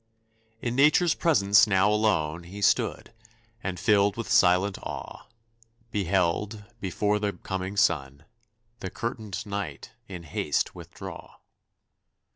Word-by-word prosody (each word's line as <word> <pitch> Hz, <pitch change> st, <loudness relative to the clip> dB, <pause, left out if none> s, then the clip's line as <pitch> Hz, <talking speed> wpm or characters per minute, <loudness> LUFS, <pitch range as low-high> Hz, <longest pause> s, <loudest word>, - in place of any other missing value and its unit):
In 120 Hz, 0 st, -1 dB
Nature's 155 Hz, +5 st, +4 dB
presence 100 Hz, -10 st, +4 dB
now 95 Hz, -1 st, +3 dB
alone 85 Hz, -7 st, +1 dB
He 100 Hz, +4 st, -7 dB
stood, 115 Hz, -, +1 dB, 0.5 s
and 90 Hz, -2 st, -3 dB
filled 100 Hz, -2 st, +3 dB
with 115 Hz, -, -4 dB
silent 95 Hz, +2 st, +4 dB
awe, -, -, -8 dB, 0.6 s
Beheld, 100 Hz, +2 st, 0 dB
before 105 Hz, +2 st, 0 dB
the 105 Hz, -1 st, -1 dB
coming 95 Hz, +1 st, -5 dB
sun, 75 Hz, -8 st, +1 dB, 0.5 s
The 95 Hz, -, -5 dB
curtained 110 Hz, -2 st, -5 dB
Night 100 Hz, -8 st, -5 dB, 0.2 s
in 90 Hz, -3 st, -8 dB
haste 80 Hz, -, -1 dB
withdraw. -, -, -10 dB
100 Hz, 110 wpm, -27 LUFS, 90-105 Hz, 0.6 s, Nature's